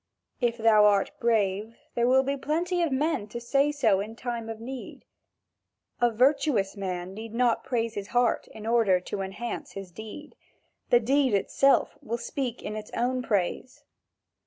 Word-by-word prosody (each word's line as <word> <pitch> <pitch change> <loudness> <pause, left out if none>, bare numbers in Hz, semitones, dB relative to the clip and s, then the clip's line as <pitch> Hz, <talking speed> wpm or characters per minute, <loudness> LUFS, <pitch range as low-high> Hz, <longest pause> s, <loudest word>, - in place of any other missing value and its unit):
If 240 -2 +1
thou 220 -2 +5
art 200 -1 +3
brave, 220 -1 +1 0.2
there 235 0 +1
will 260 +1 +5
be 275 +1 -1
plenty 340 +6 -1
of 330 -4 +1
men 275 -4 0
to 235 +3 -6
say 275 +5 +2
so 230 -10 +2
in 215 +3 -5
time 235 -2 -4
of 225 -1 -6
need. 255 +3 -8 0.9
A 240 - +4
virtuous 250 -4 +2
man 185 -2 -4
need 220 +2 -8
not 240 -1 +2
praise 230 -3 -1
his 200 -2 -5
heart 245 -1 +1
in 220 - -11
order 225 -5 +3
to 195 +2 -5
enhance 195 +5 -5
his 195 -2 -8
deed; 220 - -9 0.6
the 240 - +6
deed 260 0 +2
itself 275 +7 +2
will 235 +2 -3
speak 245 -1 -4
in 210 - -4
its 215 0 -7
own 255 +1 0
praise. 210 +2 -2
230 Hz, 165 wpm, -27 LUFS, 210-260 Hz, 0.9 s, the